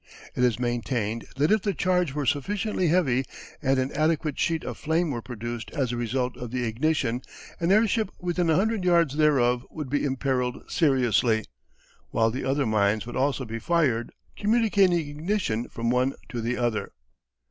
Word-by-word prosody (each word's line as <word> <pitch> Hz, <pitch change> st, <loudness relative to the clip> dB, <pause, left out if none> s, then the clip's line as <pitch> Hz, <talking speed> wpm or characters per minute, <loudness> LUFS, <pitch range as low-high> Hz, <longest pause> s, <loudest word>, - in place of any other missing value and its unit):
It 125 Hz, -, +1 dB
is 120 Hz, -4 st, +3 dB
maintained 120 Hz, -2 st, -2 dB
that 145 Hz, +5 st, +2 dB
if 215 Hz, -1 st, +4 dB
the 200 Hz, -1 st, -1 dB
charge 180 Hz, -5 st, +1 dB
were 145 Hz, -2 st, -1 dB
sufficiently 195 Hz, -, 0 dB
heavy 145 Hz, -7 st, +2 dB, 0.4 s
and 135 Hz, -2 st, +2 dB
an 130 Hz, +1 st, 0 dB
adequate 155 Hz, -1 st, 0 dB
sheet 165 Hz, -2 st, 0 dB
of -, -, -6 dB
flame 160 Hz, +1 st, 0 dB
were 120 Hz, -3 st, -3 dB
produced 120 Hz, 0 st, -6 dB
as 135 Hz, -5 st, 0 dB
a -, -, -2 dB
result 125 Hz, +2 st, -1 dB
of 125 Hz, -, -6 dB
the 125 Hz, +1 st, -2 dB
ignition, 125 Hz, +1 st, 0 dB, 0.4 s
an 170 Hz, +2 st, +1 dB
airship 220 Hz, 0 st, +3 dB
within 175 Hz, -1 st, -1 dB
a 160 Hz, -, +4 dB
hundred 215 Hz, +2 st, +1 dB
yards 170 Hz, -5 st, +3 dB
thereof 130 Hz, -5 st, +3 dB
would 150 Hz, -5 st, -6 dB
be 145 Hz, -, +1 dB
imperilled 130 Hz, -2 st, -1 dB
seriously, 120 Hz, -, +2 dB, 0.6 s
while 115 Hz, 0 st, +2 dB
the 130 Hz, -, -4 dB
other 135 Hz, +1 st, +1 dB
mines 105 Hz, -1 st, +1 dB
would 120 Hz, -, -7 dB
also 135 Hz, 0 st, 0 dB
be 115 Hz, 0 st, -5 dB
fired, 140 Hz, -8 st, +1 dB, 0.2 s
communicating 205 Hz, -4 st, +3 dB
ignition 150 Hz, -, -2 dB
from 115 Hz, 0 st, -2 dB
one 130 Hz, +2 st, +2 dB, 0.2 s
to 120 Hz, -, -4 dB
the 120 Hz, +2 st, -1 dB
other. 120 Hz, -3 st, -1 dB
135 Hz, 170 wpm, -26 LUFS, 120-170 Hz, 0.6 s, if